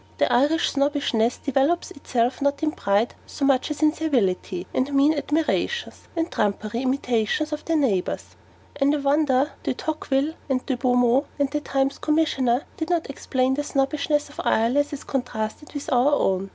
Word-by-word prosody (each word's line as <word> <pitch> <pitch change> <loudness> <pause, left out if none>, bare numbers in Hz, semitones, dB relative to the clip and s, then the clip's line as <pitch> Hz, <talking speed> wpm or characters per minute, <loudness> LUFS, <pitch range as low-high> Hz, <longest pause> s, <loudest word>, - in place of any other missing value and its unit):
The - - +2
Irish 295 +7 +3
snobbishness 275 -5 +1
developes 280 +5 0
itself 250 -2 -1
not 280 +2 0
in 310 - +2
pride 205 -2 0
so 280 - -2
much 275 0 +2
as 300 +1 -3
in 305 0 +5
servility 195 - -1
and 265 +2 0
mean 285 +3 +5
admirations, 320 +10 -1
and 330 0 -1
trumpery 215 +3 -1
imitations 260 +2 0
of 300 - -4
their 330 - 0
neighbours. 215 -11 -1 0.4
And 285 +1 +3
I - - 0
wonder 280 -1 +2
De - - -2
Tocqueville 300 -1 -1 0.2
and 255 -1 0
De 265 - 0
Beaumont, 245 +2 +2
and 280 -1 0
THE 300 - 0
TIMES' 275 -1 -1
Commissioner, 285 -5 +1
did 320 0 -3
not 335 -5 0
explain 260 -1 0
the 290 +2 -1
Snobbishness 295 +1 0
of 295 - -7
Ireland 250 +6 +2
as 290 - -6
contrasted 245 +1 -4
with 285 - -3
our 255 +4 +4
own. 195 -5 0
275 Hz, 165 wpm, -24 LUFS, 245-300 Hz, 0.4 s, in